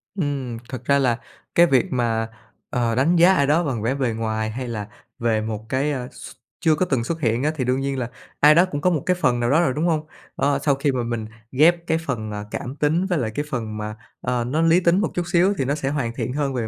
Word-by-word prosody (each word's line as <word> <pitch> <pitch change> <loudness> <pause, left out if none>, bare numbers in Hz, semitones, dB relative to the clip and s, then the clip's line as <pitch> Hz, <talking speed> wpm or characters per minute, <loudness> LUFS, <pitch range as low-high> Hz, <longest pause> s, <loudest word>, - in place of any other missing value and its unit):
Ừm, 140 - -2
thật 130 -2 -7
ra 140 +1 +3
là 125 -4 +2 0.4
cái 170 - +7
việc 130 -6 +3
mà, 115 -3 0 0.4
ờ, 120 -2 0
đánh 145 +8 +3
giá 175 +3 +6
ai 140 -6 +2
đó 155 +4 +3
bằng 130 -8 -2
vẻ 120 +5 0
bề 130 -4 0
ngoài 110 -1 -2
hay 125 +3 -5
là 105 -4 -4 0.3
về 115 -2 +1
một 110 0 -5
cái, 135 +3 0
ờ, 125 -3 -3
x - - -10 0.3
chưa 160 -1 +3
có 185 - +1
từng 135 -8 0
xuất 165 +6 -4
hiện 115 -1 +1
á, 155 - +2
thì 135 - -1
đương 130 +1 +1
nhiên 135 -1 -2
là 120 -2 -3 0.3
ai 150 +1 +7
đó 175 +3 +6
cũng 145 - -3
có 180 - +3
một 160 -6 -1
cái 180 - +2
phần 125 -9 +1
nào 120 0 +1
đó 150 +6 +4
rồi, 165 -7 +1
đúng 155 +4 -1
hông? 155 -2 0 0.3
Ơ, 140 0 +1
sau 140 -2 +3
khi 140 +1 0
mà 125 -2 -1
mình 115 -2 -3 0.3
ghép 170 +5 +3
cái 160 - +2
phần, 125 -9 -4
ờ, 105 0 -5
cảm 130 +3 -5
tính 155 +5 +1
với 180 -3 0
lại 110 -4 -2
cái 145 - -1
phần 110 -6 -4
mà, 105 0 -5 0.3
ờ, 125 -1 -1
nó 140 +7 0
lý 165 +2 +5
tính 175 +1 +3
một 220 - -1
chút 175 - -1
xíu 180 +3 +4
thì 135 - 0
nó 140 +3 0
sẽ 135 -3 -2
hoàn 135 -5 -2
thiện 125 - -3
hơn 140 -1 -1
về 120 -3 -2
135 Hz, 270 wpm, -22 LUFS, 120-155 Hz, 0.4 s, cái